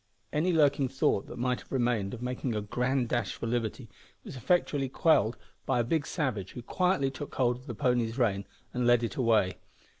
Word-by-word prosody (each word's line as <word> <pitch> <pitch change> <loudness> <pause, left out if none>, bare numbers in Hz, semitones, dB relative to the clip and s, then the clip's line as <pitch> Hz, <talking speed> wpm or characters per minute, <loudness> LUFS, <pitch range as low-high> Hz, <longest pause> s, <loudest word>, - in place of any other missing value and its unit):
Any 160 +5 +2
lurking 145 -4 +3
thought 130 -6 0
that 120 - -8
might 125 +1 0
have - - -17
remained 120 -5 0
of 120 - -9
making 125 -1 -2
a 105 - -1
grand 125 +4 0
dash 120 -2 -1
for - - -5
liberty 115 -2 -2 0.4
was - - -9
effectually 140 -1 +1
quelled 125 - +3 0.3
by - - +2
a - - +3
big 145 +5 0
savage, 120 - -2
who 120 - -7
quietly 180 -4 +1
took 140 +2 -8
hold 125 -2 +2
of 125 +3 -16
the 120 - -5
pony's 120 0 +1
rein 100 -6 +1 0.3
and 125 -1 0
led 120 -1 +5
it 115 - -3
away. 110 -7 +2
125 Hz, 200 wpm, -29 LUFS, 115-135 Hz, 0.4 s, led